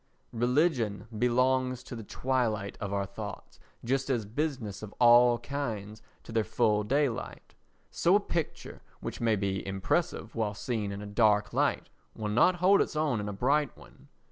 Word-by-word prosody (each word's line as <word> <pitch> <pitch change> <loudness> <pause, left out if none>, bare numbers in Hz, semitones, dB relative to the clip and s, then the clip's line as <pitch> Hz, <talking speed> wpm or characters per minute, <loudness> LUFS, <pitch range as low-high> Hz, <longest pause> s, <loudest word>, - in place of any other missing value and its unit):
Religion 120 -3 +1
belongs 125 +2 +1
to 125 - -8
the 115 - -6
twilight 110 -3 -1
of 100 -1 -3
our 100 -1 -1
thoughts, 100 0 -8 0.3
just 135 +3 0
as 120 -5 0
business 120 -3 -3
of 105 -1 -9
all 120 0 +6
kinds 110 -7 -5 0.2
to - - -11
their 110 -1 +1
full 105 0 +1
daylight. 135 +2 -2 0.4
So 175 +3 +3
a - - +6
picture 170 -6 -4 0.2
which - - -6
may 115 -2 +3
be 95 -1 -2
impressive 110 - -1
while 105 -2 -2
seen 110 -3 -3
in 100 +1 -6
a - - -7
dark 105 0 +2
light - - 0 0.3
will 105 -1 -3
not 120 +12 +4
hold 185 +3 +4
its - - -2
own 150 -7 +1
in 105 0 -3
a - - -4
bright 140 +7 +1
one. - - -17
115 Hz, 170 wpm, -29 LUFS, 105-130 Hz, 0.4 s, all